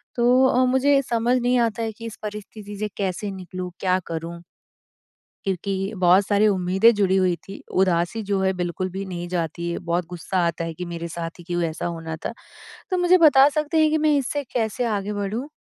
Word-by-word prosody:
तो 250 +2 +4
अ, 255 0 +3
मुझे 270 +2 +3
समझ 240 +1 +1
नहीं 245 +1 +2
आता 230 -1 0
है 225 - -2
कि 230 +2 -10
इस 220 - -8
परिस्थिति 210 0 -7
से 215 - -1
कैसे 195 +1 -2
निकलूँ? 185 -1 -6
क्या 185 -1 +2
करूँ? 165 +1 -5 1.1
क्योंकि 195 +2 -2
बहुत 185 +2 +5
सारी 210 +1 +3
उम्मीदें 190 +3 +4
जुड़ी 195 -2 +2
हुई 185 -2 +3
थी। 195 - -9 0.2
उदासी 180 +4 0
जो 200 -1 -1
है 190 - +2
बिल्कुल 180 0 -3
भी 190 +2 -5
नहीं 175 -2 -6
जाती 170 -1 -3
है, - - -2
बहुत 175 0 -2
गुस्सा 180 +2 -4
आता 170 0 -2
है 165 -1 -5
कि 180 - -5
मेरे 170 0 -5
साथ 165 0 -5
ही 175 - -12
क्यों 175 0 -2
ऐसा 155 - -5
होना 165 -2 -5
था? - - -3 0.6
तो 370 - +1
मुझे 355 +1 +5
बता 290 -4 +7
सकते 305 +2 -1
हैं 310 -1 +4
कि 315 - +2
मैं 305 -1 +3
इससे 280 +2 -2
कैसे 230 +1 0
आगे 200 +1 -3
बढ़ूँ? 205 +7 -3
195 Hz, 205 wpm, -23 LUFS, 175-235 Hz, 1.1 s, बता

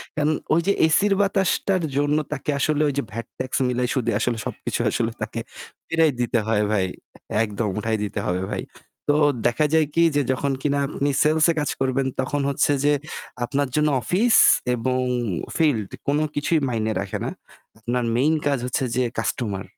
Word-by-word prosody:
কারণ 155 0 +1 0.2
ওই 170 - +4
যে 200 - +4
AC-র 195 +6 +3
বাতাসটার 195 -2 +1
জন্য 145 +1 +2 0.2
তাকে 150 +1 -5
আসলে 150 +1 +1
ওই - - -2
যে 140 - +1
VAT 115 +2 -5
tax 130 0 -4 0.2
মিলাই 125 0 0
সুদে 120 -4 0
আসলে 120 -2 0
সবকিছু - - -4
আসলে 115 -1 0
তাকে 110 +2 -3 0.5
ফেরাই 165 -2 +3
দিতে 120 -1 +1
হয় 105 -1 +2
ভাই, 100 -3 +2 0.6
একদম 105 0 -2
উঠাই 110 +1 -1
দিতে 105 - -3
হবে 90 +1 -1
ভাই। - - -3 0.5
তো 145 - +5 0.3
দেখা 150 +6 +1
যায় 160 -2 +4
কি 170 - +4
যে 145 - +3
যখন 140 +2 -1
কিনা 140 -1 +1
আপনি 145 0 -1
sales-এ 155 +2 +3
কাজ 150 - -1
করবেন 135 0 0
তখন 140 +2 0
হচ্ছে 140 +1 +2
যে 145 - +5 0.5
আপনার 140 +1 -1
জন্য 150 0 +3
office 220 - +3 0.4
এবং 130 +2 -1 0.6
field 130 - +1 0.2
কোন 145 +1 +2 0.2
কিছুই 145 +2 +1
মাইনে 110 -2 -1
রাখে 100 -1 -3
না। - - -1 0.5
আপনার 120 +2 -1
main 145 +6 +3
কাজ 140 -3 +1
হচ্ছে 125 +1 -1
যে 130 - +2 0.2
customer, 105 -6 -2
140 Hz, 175 wpm, -23 LUFS, 120-150 Hz, 0.6 s, তো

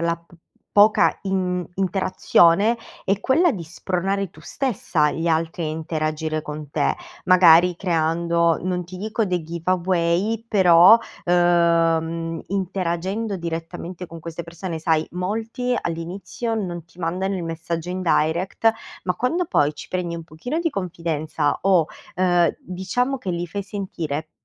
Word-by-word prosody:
la 170 0 0
p 170 +1 -27 0.4
poca 210 +1 +5
in 185 -2 -1
interazione, 190 +2 +3 0.3
è 195 +1 +1
quella 325 - +3
di 180 -5 -5
spronare 190 +3 -2
tu - - -17
stessa 185 - 0
gli 165 +1 -2
altri 165 +1 0
a - - -1
interagire 155 0 -2
con 150 -1 -7
te, - - +1 0.3
magari 180 -1 +6
creando 170 -1 +1
non 180 -1 -2
ti 180 +2 -10
dico 215 +3 -1
dei 180 -3 -1
giveaway, 175 +5 0
però, 185 +1 +7 0.3
uhm, 165 -2 +2
interagendo 190 +2 -2
direttamente 170 +1 -6
con 165 0 -10
queste 165 +1 -6
persone. 170 0 -6
Sai, 160 -1 +1
molti 225 +7 -2
all'inizio 175 +7 -4
non 175 -5 -4
ti 170 +1 -24
mandano 185 +3 -1
il 175 - -4
messaggio 165 +1 -4
in 185 +1 -3
direct, 175 +6 +2 0.3
ma 180 - 0
quando 290 - 0
poi 145 - +2
ci - - -9
prendi 180 -2 -2
un 165 - -8
pochino 180 - -4
di 335 -1 0
confidenza 165 - -2
o, 185 -5 +4 0.3
ehm, 175 -2 +3
diciamo 245 +9 -2
che 190 -7 -4
li 175 0 -2
fai 200 +4 -4
sentire, 165 -6 -5
175 Hz, 140 wpm, -22 LUFS, 165-195 Hz, 0.4 s, però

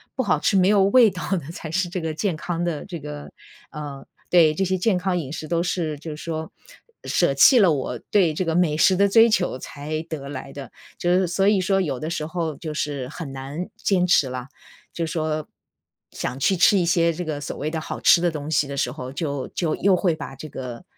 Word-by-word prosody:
不 260 - 0
好 205 - +1
吃、 - - +1
没 185 0 +4
有 205 -1 +4
味 225 +3 +6
道 180 -5 -6
的， 165 -5 -2
才 165 -1 -8
是 175 +2 -1
这 180 - -3
个 160 -2 -3
健 175 +1 -2
康 175 +2 -3
的 170 -4 -3
这 175 -4 -7
个 150 0 -8 0.4
呃， 145 -3 -7 0.2
对， 165 -4 +5
这 190 - -1
些 190 0 0
健 185 +1 +1
康 180 0 -1
饮 150 -4 -4
食 155 - -6
都 170 +1 0
是 165 -4 -2
就 155 +1 -7
说， 160 0 -5 0.5
舍 - - +2
弃 265 - +7
了 190 -6 +5
我 130 -3 -2
对 180 -6 +3
这 180 +4 -2
个 165 - 0
美 170 -4 +2
食 185 +3 +5
的 200 +2 +4
追 225 +3 +6
求， 180 - 0
才 150 +4 -5
得 150 -4 -7
来 135 -1 -7
的。 140 -4 -9 0.3
就 175 - +1
是 190 - +2
所 195 +3 +1
以 205 -1 +4
说 195 +1 +2
有 140 -8 -2
的 155 - -4
时 155 -2 -2
候 160 -1 -3
就 155 +1 -6
是 145 -4 -3
很 150 -2 -7
难 135 +6 -6
坚 185 -3 +1
持 150 -6 +4
了， 125 0 -6 0.5
就 170 - -2
说 155 -2 -2 0.6
想 125 - -4
去 190 +8 +2
吃 185 +3 +5
一 180 - +2
些 170 0 +3
这 175 +3 -4
个 155 -2 -3
所 145 - -5
谓 150 - -2
的 160 - -2
好 - - -6
吃 170 - +6
的 175 - +2
东 150 -1 -6
西 145 -2 +2
的 140 - -5
时 - - 0
候， 130 0 -7
就 140 -3 -3
就 165 -3 -1
又 195 -1 +3
会 175 -2 +1
把 140 -3 -8
这 155 +3 -9
个， 125 -4 -7
160 Hz, 250 characters per minute, -23 LUFS, 145-180 Hz, 0.6 s, 弃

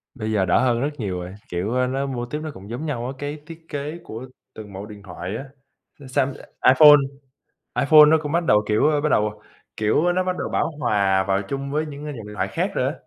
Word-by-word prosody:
Bây 110 -3 -3
giờ 100 -3 +2
đỡ 90 - +3
hơn 120 -2 +2
rất 140 - +1
nhiều 95 -5 -3
rồi, 90 +1 -7 0.2
kiểu, 110 +9 0
nó 135 +2 -1
mô 125 -3 -3
típ 150 +5 -5
nó 155 0 -5
cũng 100 -3 -12
giống 120 +7 -5
nhau 130 -6 -3
á, - - -3
cái 145 +2 -5
thiết 165 0 -11
kế 145 +3 -4
của 115 +4 -8 0.3
từng 105 -2 -10
mẫu 95 +2 -7
điện 105 -1 -12
thoại 90 +1 -6
á. 135 - -7 0.6
Ờ, 140 - -11
Sam 135 +1 0 0.4
iPhone 150 +3 +9 0.8
iPhone 150 +2 +8
nó 160 +1 +5
cũng 150 -1 -4
bắt 170 +2 +1
đầu, 105 -7 +4
kiểu 110 +8 +3
bắt 155 - +2
đầu, 105 -3 0 0.4
kiểu, 130 +11 +2
nó 185 - +2
bắt 185 0 -1
đầu - - -3
bão - - 0
hòa 100 -6 +2
vào 95 0 +1
chung 140 +2 -4
với 155 +2 0
những 145 -1 -8
dòng 150 - -5
điện 105 - -9
thoại - - -1
khác - - -2
rồi - - 0
á. - - -1
130 Hz, 240 wpm, -23 LUFS, 105-150 Hz, 0.8 s, iPhone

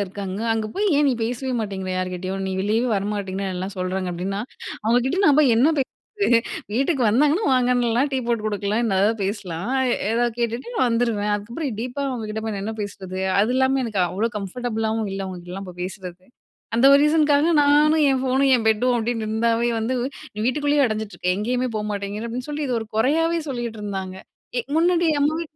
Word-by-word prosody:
இருக்காங்க. 195 +1 -6
அங்க 220 -1 -1
போய் 415 +1 0
ஏன் 295 - +4
நீ - - +3
பேசவே 250 +2 -3
மாட்டேங்கிற 190 -3 -4
யார்கிட்டயும்? 185 +1 -3
நீ 190 - -2
வெளியவே 220 +5 +1
வரமாட்டிங்கன்னு 195 -1 -2
எல்லாம் 190 +2 -4
சொல்றாங்க 185 0 -2
அப்பிடின்னா, 195 +4 -3 0.4
அவுங்கக்கிட்ட 245 - +2
நான் 295 0 +5
போய் 255 -6 +4
என்ன 255 +6 +5
பேசுறது? 260 - -2 0.8
வீட்டுக்கு 270 +1 +1
வந்தாங்கன்னா 295 - +3
வாங்கன்னுலாம் 245 +1 +2
டீ 265 - +1
போட்டு 230 -2 0
குடுக்கலாம். 210 +2 -1
என்ன 195 -4 +1
எதாவது 220 +2 +2
பேசலாம், 195 +1 -3 0.2
ஏ - - +3 0.2
ஏதாவது 240 -1 +1
கேட்டுட்டு 240 - -3
நான் 250 - +3
வந்துருவேன். 230 -3 0
அதுக்கப்பறம் 235 +3 -4
டீப்பா 255 +3 -4
அவுங்ககிட்ட 220 -3 -4
போய் 215 - -2
நான் 195 - -4
என்ன 220 +1 -3
பேசுறது? 190 -2 -6 0.2
அது 215 - +2
இல்லாம 265 0 +2
எனக்கு 215 -4 -1
அவ்ளோ 210 +6 0
கம்ஃபர்டபுள் 225 +2 -3
ஆவும் 220 -3 -2
இல்ல 195 0 -3
அவுங்ககிட்டலாம் 180 +1 -7
போய் 180 0 -10
பேசுறது. 185 -1 -8 0.5
அந்த 240 +4 +5
ஒரு 280 - +8
ரீசன் 300 0 +4
க்காக 290 +3 +3
நானும் 295 +2 +4
என் 265 -1 +1
ஃபோனும், 265 +1 +2
என் 235 - +1
பெட்டும் 245 +3 +2
அப்பிடின்னு 225 -1 -1
இருந்தாவே 230 +2 +1
வந்து, 225 +4 -1 0.4
"நீ - - -9
வீட்டுக்குள்ளேயே 290 +2 +2
அடஞ்சுட்டு 215 -2 -2
இருக்க! 180 - -4
எங்கேயுமே 250 +4 -1
போகமாட்டேங்கிற" 210 0 -3
அப்பிடின்னு 250 +4 -5
சொல்லி 295 0 -2
இத 255 - -2
ஒரு 220 - -6
குறையாவே 325 +8 +2
சொல்லிட்டு 240 -4 -4
இருந்தாங்க. 190 -2 -4 0.4
ஏ - - +2 0.2
முன்னாடி 345 +1 +3
அம்மாவே 315 +3 +1
225 Hz, 185 wpm, -23 LUFS, 200-260 Hz, 0.8 s, ஒரு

